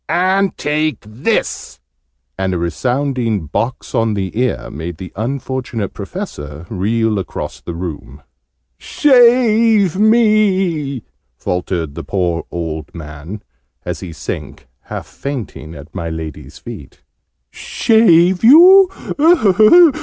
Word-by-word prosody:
"And 185 +4 +1
take 155 +1 -1
this!" 120 - -3 0.6
and 95 -1 -2
a - - 0
resounding 115 - -1
box 115 - -3
on 115 -2 +1
the 95 -1 -4
ear 125 +1 -2
made 80 +3 -6
the 90 -1 -9
unfortunate 125 -2 -4
Professor 85 - -7
reel 110 +2 0
across 95 - -6
the 85 - -7
room. 85 -3 -7 0.6
"Save 230 - +3
me!" 195 - +2 0.3
faltered 90 -4 -3
the - - -7
poor 90 -4 -2
old 80 -3 -5
man, 80 +5 -9 0.4
as - - -4
he 90 - -8
sank, 75 -3 -7 0.2
half - - -6
fainting, 115 - -7
at 70 +2 -12
my 85 -3 -4
Lady's 80 -2 -7
feet. - - -11 0.5
"Shave 185 -5 +3
you? 360 +9 +8
115 Hz, 110 wpm, -16 LUFS, -, 0.6 s, you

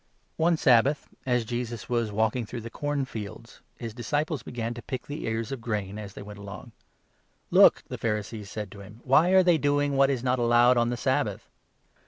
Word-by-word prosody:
One 165 +1 +2
Sabbath, 135 +2 +3 0.2
as 125 -2 +1
Jesus 120 -1 -4
was 115 -3 0
walking 110 +3 +1
through 115 +2 -6
the 115 +1 -8
corn 145 0 -2
23 115 -4 -6
fields, 105 +3 -11 0.2
his 115 -2 -6
disciples 145 +5 -2
began 115 -1 -4
to 120 - -8
pick 130 0 -5
the 145 +2 -6
ears 115 +2 -2
of 135 -3 -5
wheat 105 -4 -3
as 100 -2 -8
they - - -8
went 105 0 -10
along. 100 +3 -9 0.4
" - - -40 0.3
Look! - - +6
" - - -33
the - - -6
Pharisees 105 -1 -3
said 105 -3 -6
to 100 - -11
him, 105 +4 -12
" - - -28
why 150 +7 +4
are 190 0 +6
they 175 -3 +4
doing 145 0 +1
24 140 - -1
what 135 0 +5
is 130 -3 -1
not 125 0 +1
allowed 120 +1 +5
on 120 0 +2
the 120 - -2
Sabbath - - -1
120 Hz, 225 wpm, -27 LUFS, 110-135 Hz, 0.4 s, Look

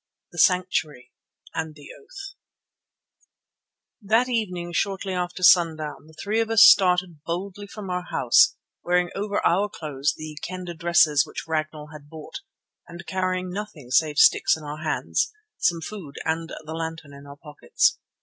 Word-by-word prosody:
THE 175 - -8
SANCTUARY 160 -9 +1 0.4
AND 160 -1 -4
THE 145 -2 -14
OATH 395 -3 -11 1.7
That 225 +5 +2
evening 180 -7 -2
shortly 195 +1 -1
after 180 0 -4
sundown 160 -4 +3
the 160 - -18
three 205 +7 -2
of 225 -1 0
us 225 -2 +7
started 180 -4 +5
boldly 190 +4 -5
from 200 -2 -8
our 180 0 -3
house 395 - +4 0.3
wearing 180 0 +1
over 205 +1 -2
our 200 +4 +2
clothes 150 -4 -3
the 155 -1 -8
Kendah 180 -1 -6
dresses 160 -3 +3
which - - -7
Ragnall 155 -1 -3
had 145 -1 -13
bought, 155 -1 -9 0.5
and 175 +1 -10
carrying 185 0 -2
nothing 180 -10 -7
save 150 +2 +2
sticks - - +5
in 160 - -12
our 150 +1 -7
hands, 155 - -1 0.3
some 170 -3 +1
food 165 -6 -8
and 165 +1 -2
the 160 0 -8
lantern 160 -2 -6
in 140 0 -13
our 140 0 -11
pockets. 315 - 0
175 Hz, 150 wpm, -24 LUFS, 155-190 Hz, 1.7 s, us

